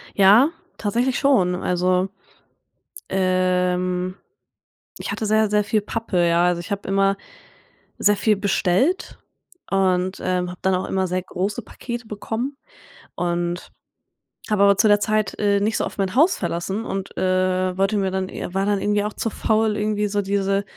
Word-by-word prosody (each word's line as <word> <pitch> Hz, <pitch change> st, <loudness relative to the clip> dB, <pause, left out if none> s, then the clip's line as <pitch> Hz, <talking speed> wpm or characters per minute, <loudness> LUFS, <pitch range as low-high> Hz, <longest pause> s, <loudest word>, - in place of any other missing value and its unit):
Ja, 210 Hz, +10 st, +6 dB, 0.3 s
tatsächlich 240 Hz, +5 st, 0 dB
schon. 210 Hz, -11 st, +3 dB
Also, 180 Hz, +1 st, +1 dB, 1.0 s
ähm, 185 Hz, -1 st, 0 dB, 0.9 s
ich -, -, -5 dB
hatte 220 Hz, -, -3 dB
sehr, 215 Hz, 0 st, +2 dB
sehr 210 Hz, 0 st, +2 dB
viel 215 Hz, +1 st, +1 dB
Pappe, 205 Hz, -5 st, -1 dB
ja. 170 Hz, +1 st, +3 dB
Also, 180 Hz, -1 st, +1 dB
ich 175 Hz, -, -8 dB
hab 200 Hz, -, -3 dB
immer 195 Hz, 0 st, +2 dB, 0.8 s
sehr 205 Hz, 0 st, +3 dB
viel 210 Hz, +1 st, +2 dB
bestellt 200 Hz, -, 0 dB, 0.5 s
und, 185 Hz, -1 st, +1 dB
ähm, 180 Hz, -1 st, -1 dB
habe 180 Hz, -, -9 dB
dann 190 Hz, 0 st, +2 dB
auch 185 Hz, +1 st, -2 dB
immer 190 Hz, -1 st, 0 dB
sehr 180 Hz, +1 st, -1 dB
große 200 Hz, +6 st, -3 dB
Pakete 240 Hz, +2 st, -7 dB
bekommen. 225 Hz, +6 st, -4 dB, 0.6 s
Und 175 Hz, 0 st, -2 dB, 0.8 s
habe 210 Hz, -2 st, +3 dB
aber 200 Hz, -1 st, +5 dB
zu 210 Hz, +2 st, +4 dB
der 205 Hz, 0 st, +5 dB
Zeit, 215 Hz, 0 st, 0 dB
äh, 200 Hz, -1 st, +2 dB
nicht 215 Hz, +2 st, 0 dB
so -, -, 0 dB
oft -, -, -7 dB
mein 195 Hz, +1 st, -1 dB
Haus 320 Hz, +8 st, +4 dB
verlassen 190 Hz, +6 st, -3 dB
und, 195 Hz, 0 st, -5 dB
äh, 185 Hz, 0 st, +1 dB
wollte 195 Hz, +2 st, +1 dB
mir 190 Hz, -1 st, 0 dB
dann 190 Hz, 0 st, -2 dB
war 190 Hz, +2 st, -3 dB
dann 205 Hz, -1 st, +1 dB
irgendwie 205 Hz, 0 st, +1 dB
auch 210 Hz, 0 st, -3 dB
zu 225 Hz, -, -2 dB
faul, 220 Hz, 0 st, +1 dB
irgendwie 210 Hz, 0 st, 0 dB
so 205 Hz, 0 st, 0 dB
diese 195 Hz, 0 st, 0 dB
195 Hz, 160 wpm, -22 LUFS, 185-210 Hz, 1.0 s, Ja